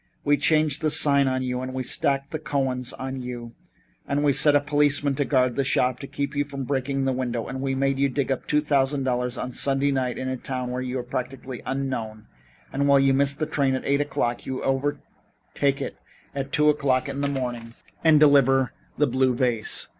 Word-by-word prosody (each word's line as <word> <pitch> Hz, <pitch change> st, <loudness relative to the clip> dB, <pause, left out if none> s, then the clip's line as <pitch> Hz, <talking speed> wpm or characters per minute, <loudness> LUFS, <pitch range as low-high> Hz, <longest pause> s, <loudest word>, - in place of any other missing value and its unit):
We 145 Hz, 0 st, +4 dB
changed 155 Hz, 0 st, +2 dB
the 155 Hz, -, +2 dB
sign 140 Hz, -2 st, +4 dB
on 130 Hz, 0 st, 0 dB
you 125 Hz, 0 st, -2 dB
and 130 Hz, 0 st, -5 dB
we 130 Hz, -, -2 dB
stacked 140 Hz, +2 st, -1 dB
the 155 Hz, -, -3 dB
Cohens 135 Hz, -4 st, -2 dB
on 130 Hz, 0 st, -5 dB
you 120 Hz, -2 st, -7 dB, 0.5 s
and 145 Hz, +1 st, 0 dB
we 145 Hz, -1 st, +3 dB
set 145 Hz, +2 st, +5 dB
a -, -, +6 dB
policeman 145 Hz, -1 st, +1 dB
to 140 Hz, +1 st, -1 dB
guard 125 Hz, -2 st, +2 dB
the 140 Hz, -, +1 dB
shop 130 Hz, -1 st, +1 dB
to 140 Hz, -, -7 dB
keep 140 Hz, +1 st, -4 dB
you 145 Hz, -, +2 dB
from 140 Hz, -1 st, -6 dB
breaking 135 Hz, 0 st, -1 dB
the 135 Hz, -, +1 dB
window, 120 Hz, -3 st, -2 dB
and 130 Hz, 0 st, -5 dB
we 135 Hz, -1 st, -1 dB
made 135 Hz, 0 st, 0 dB
you 140 Hz, 0 st, +3 dB
dig 135 Hz, +1 st, -1 dB
up 130 Hz, -, -3 dB
two 150 Hz, -, +2 dB
thousand 140 Hz, -2 st, +1 dB
dollars 125 Hz, -1 st, -1 dB
on 125 Hz, -, -4 dB
Sunday 135 Hz, +2 st, +1 dB
night 130 Hz, -2 st, -1 dB
in 130 Hz, -, -4 dB
a 130 Hz, 0 st, -2 dB
town 125 Hz, 0 st, -4 dB
where 125 Hz, +1 st, -3 dB
you 130 Hz, 0 st, -3 dB
are 125 Hz, -, -3 dB
practically 130 Hz, 0 st, -5 dB
unknown, 130 Hz, -6 st, -3 dB, 0.5 s
and 140 Hz, +1 st, +1 dB
while 140 Hz, -1 st, +6 dB
you 135 Hz, 0 st, +4 dB
missed 140 Hz, +1 st, +2 dB
the 155 Hz, -, -1 dB
train 140 Hz, -3 st, 0 dB
at 130 Hz, -, -5 dB
eight 140 Hz, +1 st, +2 dB
o'clock, 120 Hz, -4 st, -2 dB
you 130 Hz, -1 st, -4 dB
overtake 140 Hz, 0 st, -2 dB
it 135 Hz, -, -5 dB, 0.4 s
at 135 Hz, -1 st, -4 dB
two 150 Hz, 0 st, +3 dB
o'clock 140 Hz, -3 st, +1 dB
in 140 Hz, 0 st, -4 dB
the 140 Hz, -, +1 dB
morning 120 Hz, -4 st, -4 dB, 0.3 s
and 160 Hz, -2 st, +6 dB
deliver 135 Hz, -3 st, +4 dB, 0.2 s
the 150 Hz, -, +3 dB
blue 130 Hz, -1 st, +1 dB
vase. 120 Hz, -3 st, 0 dB
135 Hz, 215 wpm, -24 LUFS, 130-140 Hz, 0.5 s, a